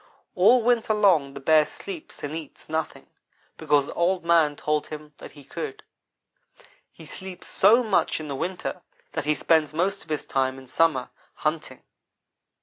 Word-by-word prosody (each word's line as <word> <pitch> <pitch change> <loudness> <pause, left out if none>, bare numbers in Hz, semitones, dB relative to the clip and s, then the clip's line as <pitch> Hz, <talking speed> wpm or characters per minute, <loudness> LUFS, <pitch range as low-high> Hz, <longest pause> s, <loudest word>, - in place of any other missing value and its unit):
All 225 +5 +5
winter 230 -2 +2
long 170 -10 +3
the - - -6
Bear 155 +2 +5
sleeps 345 - -9
and 145 +1 -4
eats 160 -3 -9
nothing, 160 0 -3 0.5
because 145 -1 +2
Old 175 0 0
man 165 -3 +4
told 150 +1 -1
him 150 -1 -9
that - - -11
he 145 - -14
could. 420 - -6 1.1
He - - -14
sleeps 190 -2 -9
so 225 +6 +4
much 210 -7 +1
in 155 - -7
the 140 - -4
winter 180 +6 -4 0.3
that - - -3
he 150 0 +2
spends 155 +2 +2
most 195 +4 0
of - - -21
his 155 - -2
time 130 -1 0
in 135 - -12
summer 130 -1 +1 0.2
hunting. 155 +1 -3
160 Hz, 160 wpm, -25 LUFS, 150-190 Hz, 1.1 s, All